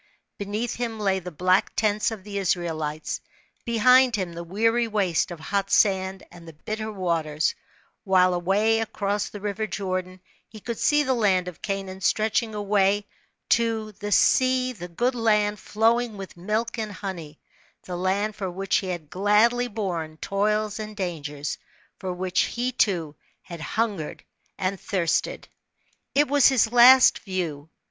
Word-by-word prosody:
Beneath 210 +4 -3
him 230 -2 -3
lay 195 -2 +1
the 180 -1 -7
black 185 +3 +1
tents 210 -1 +1
of 220 -4 -8
the 200 0 -4
Israelites, 160 -5 -2 0.4
behind 250 +2 +5
him 185 -4 -3
the 170 +1 -6
weary 225 +6 +1
waste 195 -7 0
of 175 -2 -8
hot 195 +4 -2
sand 190 -2 +2
and 170 -1 -14
the 165 - -10
bitter 215 +8 -5
waters; 165 -6 -1 0.5
while 185 -2 +4
away 200 +6 +2
across 205 -2 -2
the 205 - -8
river 210 +1 -3
Jordan 185 -1 -4 0.3
he 215 - -11
could 230 +2 -5
see 295 0 +3
the 265 -2 +1
land 195 -6 +2
of 180 - -8
Canaan 195 -1 -4
stretching 220 +3 +1
away 205 0 +1 0.4
tc 225 -2 +1
^he 205 +1 -6
sea 255 +4 +3
the 175 -6 -8
good 240 +9 0
land 210 -3 +1
"flowing 225 +1 +1
with 195 -1 -8
milk 215 +6 -2
and 215 -2 -4
honey," 175 -6 -7 0.4
the 180 - -6
land 195 +4 -1
for 195 -3 -4
which 190 +2 0
he 190 - -3
had 170 -5 -5
gladly 210 +6 +3
borne 175 -8 -4
toils 210 +3 -1
and 215 -1 -7
dangers, 150 -6 -4 0.4
for 185 - -4
which 180 +1 -2
he, 245 +1 -2
too, 175 - 0 0.3
had 170 -2 -9
hungered 205 -4 -3 0.3
and 190 0 -2
thirsted. 175 -5 -1 0.7
It 290 +1 +4
was 285 0 +5
his 250 -4 +3
last 250 +2 +7
view. 165 -7 -4
200 Hz, 155 wpm, -25 LUFS, 180-220 Hz, 0.7 s, last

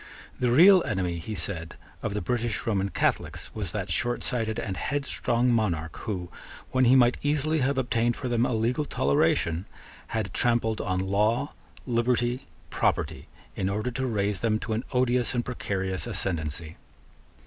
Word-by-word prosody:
The 125 - +2
real 180 +9 +8
enemy, 90 -3 -1
he 110 +6 -5
said, 85 -4 -3 0.3
of 105 -2 -3
the 105 - -2
British 120 -3 -1
Roman 100 -3 0
Catholics - - -1
was 100 -6 -3
that 100 -3 -3
shortsighted 115 +1 0
and 95 -3 -3
headstrong 125 -3 0
monarch 85 -8 0
who, 90 -6 -4 0.4
when 130 0 +3
he 125 +2 +6
might 125 -1 +5
easily 150 +2 +1
have 135 +1 +1
obtained 120 -2 +1
for 130 - -4
them 120 -1 +1
a - - +1
legal 120 +6 +1
toleration, 80 - +1 0.4
had 110 -4 -3
trampled 115 -2 +1
on 95 0 -1
law, 110 +8 +1 0.3
liberty, 120 +1 0 0.2
property, - - 0 0.3
in 95 - -1
order 105 +5 -1
to 130 +2 -2
raise 105 -3 0
them 110 -2 +2
to 110 0 -2
an 110 +3 -1
odious 125 -1 +1
and 120 - 0
precarious 95 -5 -3
ascendency. 85 -6 -2
115 Hz, 155 wpm, -27 LUFS, 95-125 Hz, 0.4 s, real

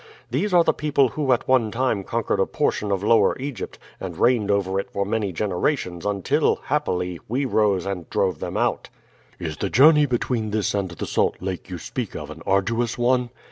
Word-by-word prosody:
These 175 - 0
are 175 -1 +6
the - - +2
people 140 -3 +2
who 140 +2 -1
at 120 - +1
one 130 -4 +3
time 115 -3 0
conquered - - -1
a - - +2
portion 105 -1 -1
of 100 0 -1
Lower 110 -2 +4
Egypt, 135 -4 -6 0.2
and 90 -4 -6
reigned 120 -4 +2
over 95 -1 +1
it - - -5
for 100 - -2
many 105 -1 -1
generations 90 - -1
until, 100 -2 +1
happily, 90 -1 -2
we 130 +5 -1
rose 105 -7 +2
and 95 -4 -4
drove 95 -1 0
them - - -4
out." - - 0 0.5
"Is 80 -3 -5
the 100 - -2
journey 150 +5 +6
between 120 -3 -1
this 105 -1 0
and 100 -2 -1
the 85 - -6
Salt - - 0
Lake 95 0 -5
you 90 - -5
speak - - -5
of - - -6
an - - -10
arduous 115 +5 +1
one?" 125 0 +2
105 Hz, 195 wpm, -23 LUFS, 95-125 Hz, 0.5 s, are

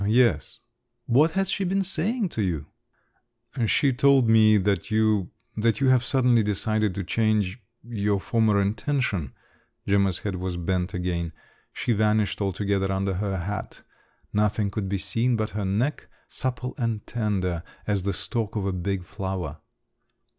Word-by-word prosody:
"Yes." 120 0 +2 0.5
"What 150 +7 +4
has 195 0 0
she 200 - -1
been 195 +2 +1
saying 195 +4 -1
to 115 - -3
you?" 85 -7 -1 1.0
"She 135 +4 +3
told 135 -1 +4
me 110 -1 +6
that 100 0 0
you… 110 -3 +2 0.3
that 115 +2 +1
you 135 -1 +3
have 130 -1 +4
suddenly 125 -3 +3
decided 105 -1 0
to 100 - -2
change… 110 +1 0 0.2
your 105 -3 -1
former 110 -1 +2
intention." 100 - -1 0.5
Gemma's 100 -2 +2
head 100 -3 -3
was 90 -1 -3
bent 90 +2 -1
again. 85 -2 -2 0.4
She 120 - -1
vanished 105 -1 +1
altogether 100 0 0
under 95 0 0
her 95 +1 -2
hat; 95 +3 -5 0.5
nothing 105 -1 +1
could 100 -2 -3
be 100 - 0
seen 115 +6 0
but 110 -1 -2
her 105 0 -3
neck, 115 +10 -1 0.2
supple 125 -1 -3
and 115 -3 -1
tender 95 -7 -1 0.2
as 100 -2 0
the 100 +2 -1
stalk 110 +1 -3
of 105 -2 -1
a 95 - 0
big 95 +1 -2
flower. 95 -5 -5
105 Hz, 150 wpm, -25 LUFS, 95-115 Hz, 1.0 s, me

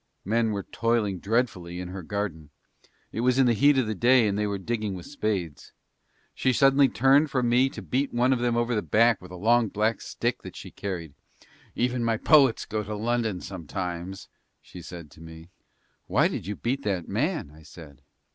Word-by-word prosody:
Men 115 +3 +1
were 100 -2 -3
toiling 115 -5 -1
dreadfully 95 -5 -1
in 90 0 -6
her 95 +1 -6
garden; 85 -5 -4 0.6
it - - -5
was 125 +2 +2
in 135 - +5
the 120 - +4
heat 140 +5 +4
of 130 - +2
the 110 - -2
day 120 +2 +4
and 100 - 0
they 105 0 0
were 100 -1 -2
digging 105 0 -3
with 90 - -9
spades; 100 - -4 0.6
she 130 - +1
suddenly 135 +2 +4
turned 135 +5 +4
from 125 -3 0
me 125 +3 +4
to - - -9
beat 135 +3 -1
one 125 +2 +2
of 125 - -1
them 120 -1 0
over 120 +1 0
the 105 - +1
back 115 0 +3
with 90 - -12
a 90 - -9
long 115 +5 +3
black 105 +1 -1
stick - - -3
that - - -10
she - - -9
carried. 85 -7 -5 0.6
"Even 125 0 0
my 115 -1 +1
poets 135 -2 +4
go 110 0 -2
to 105 +1 -5
London 110 -3 -1
sometimes," 90 +1 -6 0.3
she 90 - -12
said 85 -3 -10
to 75 - -16
me. 80 +1 -12 0.6
"Why - - +3
did - - -5
you 105 - -3
beat 130 +6 -2
that 95 -9 -2
man?" 145 - -1
I 80 +1 -16
said. 75 -2 -14
110 Hz, 200 wpm, -26 LUFS, 90-120 Hz, 0.6 s, in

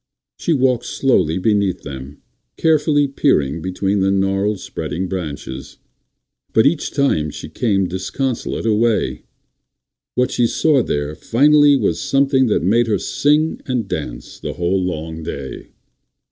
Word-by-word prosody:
She - - -1
walked 130 -5 +2
slowly 105 - +1
beneath 100 -2 0
them, 70 0 -9 0.3
carefully 150 -2 +3
peering 85 - +1
between 95 +3 -1
the 95 0 +2
gnarled, 95 +1 0
spreading 95 +1 -4
branches. 75 -7 -6 0.8
But 110 - +4
each 150 +2 +1
time 135 - +1
she - - -8
came 100 -5 0
disconsolate 115 +8 -3
away 115 0 +2
again. - - -7 0.9
What 125 0 +1
she 120 - +2
saw 150 +2 +2
there 75 -7 -2
finally 145 - +4
was - - 0
something 135 -1 +2
that 105 - +1
made 115 +6 +3
her 105 -2 +1
sing 150 - +1
and 125 -5 -1
dance 60 -9 -6
the - - -5
whole 90 +2 0
long 80 -2 -4
day. 70 -4 -7
105 Hz, 135 wpm, -19 LUFS, 85-135 Hz, 0.9 s, But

